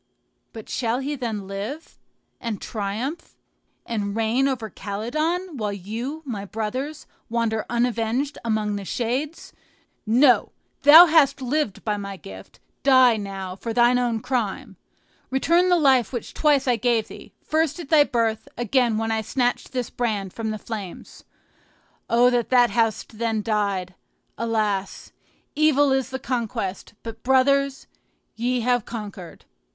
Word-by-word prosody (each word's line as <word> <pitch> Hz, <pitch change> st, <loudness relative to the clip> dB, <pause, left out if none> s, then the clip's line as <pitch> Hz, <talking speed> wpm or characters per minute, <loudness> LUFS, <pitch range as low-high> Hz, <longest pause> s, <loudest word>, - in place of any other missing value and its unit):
But 220 Hz, -3 st, -10 dB
shall 235 Hz, -1 st, -1 dB
he 280 Hz, +3 st, -3 dB
then 225 Hz, -7 st, -4 dB
live, 205 Hz, +11 st, -7 dB, 0.4 s
and 230 Hz, -4 st, -4 dB
triumph, 225 Hz, +9 st, -5 dB, 0.5 s
and 205 Hz, -3 st, -3 dB
reign 225 Hz, +4 st, +2 dB
over 250 Hz, -5 st, -2 dB
Calydon, 305 Hz, -, -3 dB
while 210 Hz, -3 st, -2 dB
you, 230 Hz, -, -5 dB
my 215 Hz, -7 st, -4 dB
brothers, 240 Hz, +9 st, -4 dB, 0.2 s
wander 225 Hz, -2 st, -1 dB
unavenged 240 Hz, +3 st, -1 dB
among 215 Hz, -2 st, -1 dB
the 200 Hz, -, -6 dB
shades? 255 Hz, -, -3 dB, 0.5 s
No! 250 Hz, +3 st, +4 dB, 0.3 s
thou 310 Hz, +5 st, +10 dB
hast 300 Hz, -5 st, +4 dB
lived 260 Hz, -5 st, -2 dB
by 210 Hz, -1 st, 0 dB
my 200 Hz, -1 st, -6 dB
gift; 95 Hz, -, -12 dB, 0.2 s
die, 260 Hz, -3 st, +6 dB
now, 195 Hz, -3 st, -5 dB
for 230 Hz, +4 st, -5 dB
thine 240 Hz, +1 st, +4 dB
own 235 Hz, -3 st, -1 dB
crime. 235 Hz, -2 st, -2 dB, 0.5 s
Return 340 Hz, +7 st, +2 dB
the 355 Hz, -, +5 dB
life 265 Hz, -, +3 dB
which 240 Hz, -4 st, -5 dB
twice 290 Hz, -3 st, +2 dB
I 245 Hz, -2 st, +3 dB
gave 230 Hz, -1 st, +1 dB
thee, -, -, -12 dB
first 315 Hz, +1 st, 0 dB
at 320 Hz, -5 st, -8 dB
thy 310 Hz, -2 st, +6 dB
birth, 225 Hz, -4 st, -1 dB
again 240 Hz, -1 st, +1 dB
when 225 Hz, 0 st, -1 dB
I 220 Hz, 0 st, 0 dB
snatched 245 Hz, +2 st, -1 dB
this 250 Hz, -3 st, -3 dB
brand 210 Hz, -6 st, -2 dB
from 225 Hz, -1 st, -4 dB
the 215 Hz, -, -3 dB
flames. 210 Hz, -5 st, -8 dB, 0.9 s
O 245 Hz, +2 st, +5 dB
that 240 Hz, -2 st, 0 dB
thou 245 Hz, -1 st, +5 dB
hadst 225 Hz, -1 st, -1 dB
then 225 Hz, -2 st, 0 dB
died! 200 Hz, -4 st, -1 dB, 0.4 s
Alas! 215 Hz, -4 st, -2 dB, 0.4 s
evil 290 Hz, -2 st, +4 dB
is 265 Hz, -1 st, +1 dB
the 265 Hz, -, -4 dB
conquest; 225 Hz, -8 st, -4 dB
but, 225 Hz, -1 st, -8 dB
brothers, 270 Hz, +1 st, +2 dB, 0.5 s
ye 245 Hz, +2 st, 0 dB
have 245 Hz, -1 st, +1 dB
conquered." 205 Hz, -7 st, -8 dB
235 Hz, 140 wpm, -23 LUFS, 215-265 Hz, 0.9 s, thou